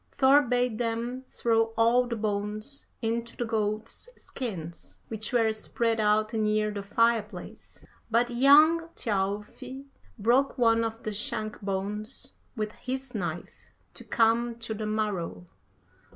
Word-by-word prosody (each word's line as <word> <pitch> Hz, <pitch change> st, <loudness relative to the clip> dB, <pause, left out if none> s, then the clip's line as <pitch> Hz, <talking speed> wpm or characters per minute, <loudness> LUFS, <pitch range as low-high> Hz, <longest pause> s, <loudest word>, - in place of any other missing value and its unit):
Thor 275 Hz, +1 st, +6 dB
bade 245 Hz, -3 st, 0 dB
them 240 Hz, +2 st, -2 dB
throw 225 Hz, -1 st, +1 dB
all 240 Hz, +2 st, +4 dB
the 235 Hz, -, -2 dB
bones 215 Hz, +4 st, -3 dB, 0.2 s
into 230 Hz, +1 st, -2 dB
the 240 Hz, -, -1 dB
goats' 220 Hz, -, -2 dB
skins 175 Hz, -10 st, -7 dB
which 220 Hz, +1 st, -3 dB
were 225 Hz, -3 st, +3 dB
spread 225 Hz, +1 st, -1 dB
out 215 Hz, +1 st, +2 dB
near 215 Hz, -1 st, +1 dB
the 205 Hz, -1 st, -4 dB
fire 230 Hz, +3 st, +3 dB
place, 205 Hz, -4 st, -11 dB, 0.2 s
but 235 Hz, +2 st, +2 dB
young 300 Hz, +6 st, +6 dB
Thjalfi 210 Hz, +6 st, -3 dB, 0.3 s
broke 245 Hz, +6 st, +2 dB
one 230 Hz, -2 st, +4 dB
of 225 Hz, 0 st, -4 dB
the 215 Hz, -, -3 dB
shank 215 Hz, +1 st, -2 dB
bones 205 Hz, +4 st, -4 dB, 0.2 s
with 215 Hz, -2 st, -2 dB
his 260 Hz, +2 st, -5 dB
knife 175 Hz, -5 st, -5 dB, 0.2 s
to -, -, -9 dB
come 230 Hz, +1 st, +2 dB
to 230 Hz, -1 st, -4 dB
the 215 Hz, 0 st, -4 dB
marrow. 195 Hz, -, -2 dB
225 Hz, 135 wpm, -28 LUFS, 210-240 Hz, 0.3 s, Thor